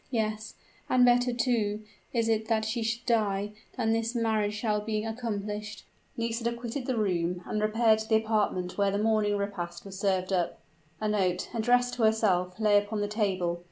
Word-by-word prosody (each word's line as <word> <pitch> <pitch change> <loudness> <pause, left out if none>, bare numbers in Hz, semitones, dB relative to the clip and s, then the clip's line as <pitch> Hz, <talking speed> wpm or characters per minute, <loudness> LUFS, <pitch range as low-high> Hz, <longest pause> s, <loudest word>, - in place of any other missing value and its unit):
Yes 215 -2 -2 0.3
and 250 -1 +5
better, 245 0 +4
too, 225 -4 0 0.3
is 230 -2 +1
it 220 -1 +1
that 220 -1 +1
she 225 +2 -2
should 225 +1 -2
die, 210 -4 +1 0.3
than 225 -3 +1
that 225 - +2
this 230 +2 -3
marriage 220 -3 +1
shall 210 -1 0
be 215 0 -2
accomplished!" 210 -2 -4 0.3
Nisida 230 0 -1
quitted 240 +2 -5
the 255 -3 0
room, 180 -4 0
and 215 - -2
repaired 220 +1 +3
to 220 - -6
the 220 - +4
apartment 210 -4 0
where 200 -1 +3
the 200 - -1
morning 210 -1 +2
repast 180 -4 -4
was 195 -1 -8
served 190 -1 0
up. 175 -2 0 0.4
A 215 - -1
note, 185 -4 0
addressed 245 +2 +2
to 245 - -4
herself, 195 -4 +2
lay 210 -2 +5
upon 205 +1 -3
the 205 - 0
table. 190 -5 -1
215 Hz, 185 wpm, -29 LUFS, 200-230 Hz, 0.4 s, and